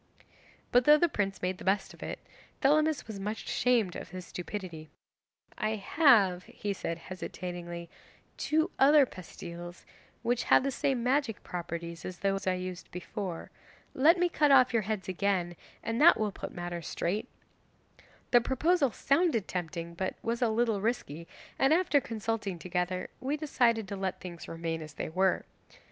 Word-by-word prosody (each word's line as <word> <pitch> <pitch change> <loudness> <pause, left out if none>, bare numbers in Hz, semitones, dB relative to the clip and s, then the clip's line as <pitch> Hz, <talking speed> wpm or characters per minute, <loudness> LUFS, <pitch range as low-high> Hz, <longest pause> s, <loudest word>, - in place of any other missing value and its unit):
'But 245 0 +5
though 300 0 +8
the 345 - +4
prince 195 - -2
made 180 0 -1
the - - -9
best 195 +1 0
of - - -16
it, - - -4 0.4
Thelamis 305 +2 +3
was 215 -3 -7
much 210 +2 -4
ashamed 230 -8 +2
of - - -7
his 185 0 -7
stupidity. 175 -4 -6 0.7
"I 215 0 0
have," 200 - +4
he 205 -1 -4
said 170 -3 -4
hesitatingly, 175 -1 -6 0.5
"two 315 +4 +1
other 285 +1 +7
pastilles 175 -3 -9 0.4
which 240 0 0
have - - +5
the 275 - 0
same 260 -2 0
magic 255 -3 0
properties 170 -1 -5
as 185 - -6
those 195 0 -1
I 185 - +3
used 180 -1 -6
before. 180 0 -6 0.4
Let 315 +7 +5
me 355 0 +3
cut 305 -4 +2
off 255 -2 +6
your 230 - +3
heads 210 -1 -3
again, 185 -2 0 0.3
and 225 +3 -1
that 335 -5 +7
will 215 -1 0
put - - -7
matters 175 -1 -5
straight." 190 +6 -2 1.0
The 240 - +7
proposal 280 +4 +2
sounded 275 - +1
tempting, 170 -1 -4
but 185 +2 -3
was 235 +1 -1
a 240 - +3
little 220 -2 +1
risky, 170 - -2 0.3
and 270 +1 +4
after 330 -5 +3
consulting 220 -5 -3
together 180 +1 -2
we 280 +3 -1
decided 235 -8 +1
to 200 - -3
let 190 -1 -3
things 175 -2 -8
remain 165 -1 -3
as 155 -1 -9
they - - -4
were. 185 +3 +1
200 Hz, 160 wpm, -30 LUFS, 180-250 Hz, 1.0 s, though